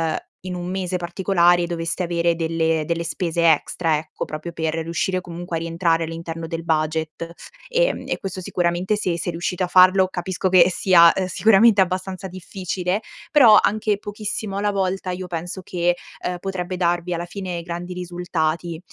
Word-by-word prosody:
uhm, - - -1 0.2
in 185 0 -6
un 175 0 -5
mese 185 -1 -2
particolare 175 0 +2
doveste 170 +1 -3
avere 170 -1 +1
delle 165 -1 0
delle 170 +1 -1
spese 170 0 +2
extra 160 +1 0
ecco, 155 0 -6
proprio 155 +2 -6
per 160 -1 -2
riuscire 170 +3 -1
comunque 175 -1 -5
a - - -2
rientrare 165 0 0
all'interno 165 0 -6
del 165 0 -4
budget. 160 +1 -2 0.4
Ehm, - - +1
e - - -1
questo 190 -1 -5
sicuramente 175 +2 0
se 185 -5 -1
se 175 - -2
riuscite 175 +2 -2
a - - 0
farlo, 185 +1 +6
capisco 185 +1 -2
che 185 -1 +6
sia, 175 -2 +6
uhm, 190 - -1
sicuramente 210 +3 +5
abbastanza 185 +1 -2
difficile, 185 +1 -3 0.3
però 240 -8 +8
anche 215 -1 +1
pochissimo 205 0 -5
alla 205 +1 +1
volta 190 -1 -1
io 180 +1 -4
penso 175 +2 -5
che, 175 -1 0 0.3
uhm, 180 0 -2
potrebbe 185 -1 -4
darvi 175 0 0
alla 170 +1 -4
fine 175 -1 -5
grandi 175 +1 -5
risultati. 175 -2 -2
175 Hz, 165 wpm, -22 LUFS, 170-185 Hz, 0.4 s, però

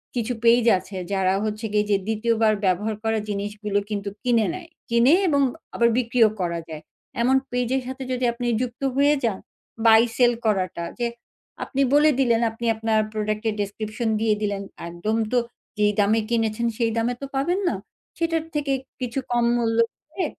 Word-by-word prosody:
কিছু 240 0 -1
পেইজ 235 0 +5
আছে 190 +1 -9 0.2
যারা 190 -1 +2
হচ্ছে 215 +1 -3
গিয়ে 210 0 +2
যে 200 - +4
২য় 225 +1 +1
বার 220 -1 +5
ব্যবহার 205 +4 +1
করা 225 0 +1
জিনিসগুলো 205 0 -2
কিন্তু 200 -1 -3
কিনে 235 -3 +3
নেয়। 355 -2 -8 0.2
কিনে 235 +5 +5
এবং 285 -4 +3 0.3
আবার 235 0 +4
বিক্রিও 235 -2 +3
করা 170 -1 -1
যায়। 155 -1 -7 0.4
এমন 255 +3 +3 0.2
পেইজের 250 +1 0
সাথে 260 +1 -5
যদি 250 0 0
আপনি 240 +1 -4
যুক্ত 250 0 -4
হয়ে 285 +2 +4
যান, 220 -5 0 0.5
বাই-সেল 230 +2 +5
করাটা। 185 -5 0 0.2
যে 240 - +1 0.6
আপনি 275 - -2
বলে 295 +1 +6
দিলেন 235 -3 +3
আপনি 225 +1 -7
আপনার 220 0 +1
প্রোডাক্টের 215 +1 -1
ডেসক্রিপশন 215 +3 -3
দিয়ে 220 -1 +3
দিলেন। 200 -1 -2 0.3
একদম 175 +6 -2 0.2
তো 250 - +2 0.4
যেই 210 0 +3
দামে 210 +2 +3
কিনেছেন 230 0 0
সেই 230 -2 +1
দামে 230 +2 +1
তো - - -3
পাবেন 345 +8 +1
না। - - -2 0.4
সেটার 330 -1 0
থেকে 290 -2 0 0.3
কিছু 250 +1 -2
কম 240 -1 +2
মূল্য 225 -1 0 0.3
দিয়ে 345 +3 -2
225 Hz, 170 wpm, -23 LUFS, 210-245 Hz, 0.6 s, বলে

